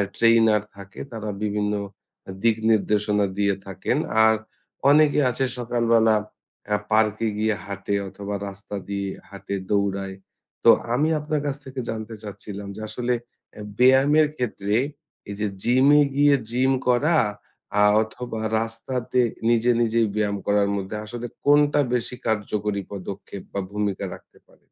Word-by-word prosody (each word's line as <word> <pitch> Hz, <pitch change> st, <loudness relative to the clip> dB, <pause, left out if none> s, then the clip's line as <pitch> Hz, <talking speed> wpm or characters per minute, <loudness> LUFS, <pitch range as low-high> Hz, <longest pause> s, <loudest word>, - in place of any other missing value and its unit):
Trainer 115 Hz, -2 st, +4 dB
থাকে 100 Hz, -1 st, -12 dB
তারা 110 Hz, -2 st, -5 dB
বিভিন্ন 105 Hz, 0 st, 0 dB, 0.7 s
দিক 115 Hz, -1 st, +3 dB
নির্দেশনা 105 Hz, -1 st, +2 dB
দিয়ে 100 Hz, -1 st, +2 dB
থাকেন। 95 Hz, -2 st, -2 dB, 0.3 s
আর 110 Hz, 0 st, +5 dB, 0.5 s
অনেকে 150 Hz, 0 st, +5 dB
আছে 130 Hz, +2 st, 0 dB
সকালবেলা 115 Hz, -2 st, +3 dB, 0.6 s
আ -, -, +5 dB, 0.2 s
পার্কে 110 Hz, +1 st, +2 dB
গিয়ে 110 Hz, 0 st, +1 dB
হাঁটে 100 Hz, 0 st, -3 dB
অথবা 100 Hz, +1 st, -5 dB
রাস্তা 100 Hz, +1 st, -8 dB
দিয়ে 100 Hz, -1 st, -2 dB, 0.2 s
হাঁটে 100 Hz, 0 st, -6 dB
দৌড়ায়। 100 Hz, -1 st, 0 dB, 0.5 s
তো -, -, +7 dB, 0.2 s
আমি 150 Hz, +6 st, +2 dB
আপনার 150 Hz, 0 st, -2 dB
কাছ 140 Hz, -, -1 dB
থেকে 130 Hz, 0 st, -7 dB
জানতে 110 Hz, 0 st, -5 dB
চাচ্ছিলাম 100 Hz, 0 st, -7 dB
যে, 110 Hz, -, -8 dB
আসলে 125 Hz, +2 st, -1 dB, 0.6 s
ব্যায়ামের 135 Hz, +5 st, +5 dB
ক্ষেত্রে 105 Hz, -4 st, -1 dB, 0.5 s
এই 100 Hz, -, -4 dB
যে 105 Hz, -, 0 dB, 0.2 s
জিমে 135 Hz, +4 st, +5 dB
গিয়ে 145 Hz, 0 st, +5 dB
জিম 130 Hz, +3 st, +2 dB, 0.2 s
করা 145 Hz, +7 st, +3 dB, 0.7 s
আ -, -, +6 dB, 0.2 s
অথবা 115 Hz, 0 st, -6 dB, 0.2 s
রাস্তাতে 115 Hz, +2 st, -3 dB, 0.3 s
নিজে 120 Hz, +1 st, +3 dB
নিজেই 115 Hz, 0 st, +2 dB
ব্যায়াম 100 Hz, -1 st, 0 dB
করার 100 Hz, 0 st, +3 dB
মধ্যে 100 Hz, +1 st, -4 dB
আসলে 120 Hz, +2 st, -6 dB, 0.2 s
কোনটা 145 Hz, 0 st, +4 dB
বেশি 125 Hz, 0 st, -1 dB
কার্যকরী 105 Hz, -1 st, -1 dB
পদক্ষেপ 100 Hz, 0 st, -7 dB
বা 100 Hz, -, -1 dB
ভূমিকা 105 Hz, -1 st, -2 dB
রাখতে -, -, -15 dB
পারে? -, -, -26 dB
110 Hz, 135 wpm, -24 LUFS, 100-125 Hz, 0.7 s, তো